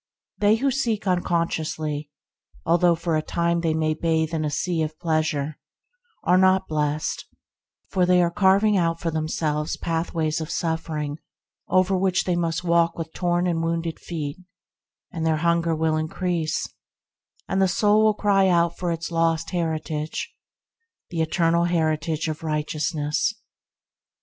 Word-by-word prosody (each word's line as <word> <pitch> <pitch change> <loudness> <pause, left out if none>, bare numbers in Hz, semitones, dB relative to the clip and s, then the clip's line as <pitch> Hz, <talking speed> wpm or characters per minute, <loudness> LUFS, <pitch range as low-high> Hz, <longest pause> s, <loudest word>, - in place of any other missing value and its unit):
They 210 +1 +4
who 270 +4 +1
seek 230 -6 -1
uncon 175 -2 +1
sciously, 155 -2 -3 0.6
although 170 +1 +4
for 165 0 -1
a 155 - +1
time 170 +1 0
they 160 -2 0
may 155 -1 +1
bathe 160 0 0
in 160 -1 0
a 150 - 0
sea 165 +3 -1
of 155 0 -3
pleasure, 155 -3 -1 0.6
are 180 +1 +4
not 190 0 +4
blest; 150 0 -2 0.6
for 185 - +2
they 180 0 +5
are 170 - +1
carving 200 +2 +4
out 165 -3 +1
for 165 - -2
themselves 155 -1 -1
pathways 165 -1 -1
of 160 - -5
suffering 160 -3 -2 0.5
over 185 +1 +3
which 185 0 +1
they 180 - 0
must 170 0 -1
walk 170 -1 +2
with 165 -1 -5
torn 175 0 0
and 170 -2 0
wounded 165 0 -2
feet, 155 -2 -5 0.7
and 165 - -4
their 160 -1 +2
hunger 170 0 +1
will 160 0 +1
increase, 160 0 -1 0.8
and 190 - 0
the 190 - +5
soul 210 +3 +3
cry 200 -2 +3
out 170 -2 +2
for 175 -1 -1
its 165 +1 -4
lost 165 -1 +1
heritage 160 -3 -3 0.4
— 460 0 -56
the 165 -2 -1
eternal 165 +1 +2
heritage 160 -2 0
of 155 -1 -4
righteousness. 150 +3 -1
165 Hz, 150 wpm, -24 LUFS, 155-180 Hz, 0.8 s, they